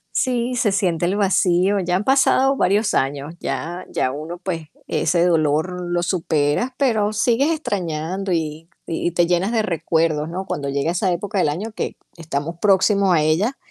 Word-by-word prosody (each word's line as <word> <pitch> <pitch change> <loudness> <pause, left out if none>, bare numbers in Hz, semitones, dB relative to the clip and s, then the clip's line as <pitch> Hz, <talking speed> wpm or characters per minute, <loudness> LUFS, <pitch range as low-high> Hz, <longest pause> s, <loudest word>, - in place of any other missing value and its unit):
Sí, 250 -1 0
se 230 -4 +2
siente 175 -4 0
el 185 +3 0
vacío, 195 -1 +2
ya 180 -1 0
han 190 - 0
pasado 270 +1 +3
varios 205 -1 +2
años, 140 +4 -1
ya 175 +3 -4
ya 130 - 0
uno, 155 +5 -6
pues, 170 -4 -4 0.2
ese 170 +1 +1
dolor 160 +1 +1
lo 175 0 0
superas, 165 - 0
pero 220 -6 +1
sigues 240 +7 +2
extrañando 185 - -3
y 160 -1 -3 0.2
y 165 +1 -1
te 175 0 +2
llenas 180 +4 +1
de 230 -2 +2
recuerdos, 160 -3 0
¿no? 185 +3 -4
Cuando 140 -6 -3
llega 140 +4 0
esa 180 +2 0
época 195 +3 -2
del 165 - +2
año 200 +9 -4
que - - -4 0.2
estamos 165 0 -4
próximos 195 -1 +3
a 160 - +3
ella, 175 - +1
180 Hz, 170 wpm, -21 LUFS, 160-205 Hz, 0.2 s, pasado